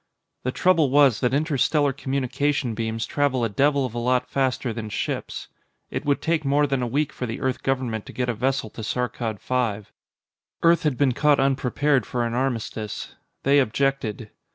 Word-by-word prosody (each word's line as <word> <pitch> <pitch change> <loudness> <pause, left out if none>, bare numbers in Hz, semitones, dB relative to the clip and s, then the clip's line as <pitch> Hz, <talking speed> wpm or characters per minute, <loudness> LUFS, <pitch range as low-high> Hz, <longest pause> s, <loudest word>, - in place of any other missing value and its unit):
The 130 - -2
trouble 165 -2 +3
was 135 -4 +5
that 125 - +1
interstellar 145 0 +2
communication 140 -1 -1
beams 115 +1 -2
travel 140 -4 0
a 115 - +1
devil 140 +6 +2
of 125 - -5
a 120 - -3
lot 125 +1 +1
faster 130 -3 -1
than 110 -1 -5
ships. - - -4 0.4
It - - -4
would 145 -1 +1
take 165 -1 +1
more 145 +1 +3
than 135 -2 -1
a 125 - -1
week 145 +5 -1
for 125 - -4
the 115 - -4
Earth 130 -1 -1
government 125 -5 -2
to - - -8
get 125 -1 -1
a 125 - 0
vessel 125 0 -1
to - - -8
Saarkkad 115 -2 -2
V. 110 -5 -2 0.7
Earth 170 0 +5
had 150 -5 0
been 140 -3 +3
caught 145 +3 +3
unprepared 135 +1 +1
for 120 -1 -1
an 115 - -3
armistice. 115 -4 -3 0.3
They 140 +1 +5
objected. 130 -3 -1
130 Hz, 180 wpm, -24 LUFS, 120-140 Hz, 0.7 s, was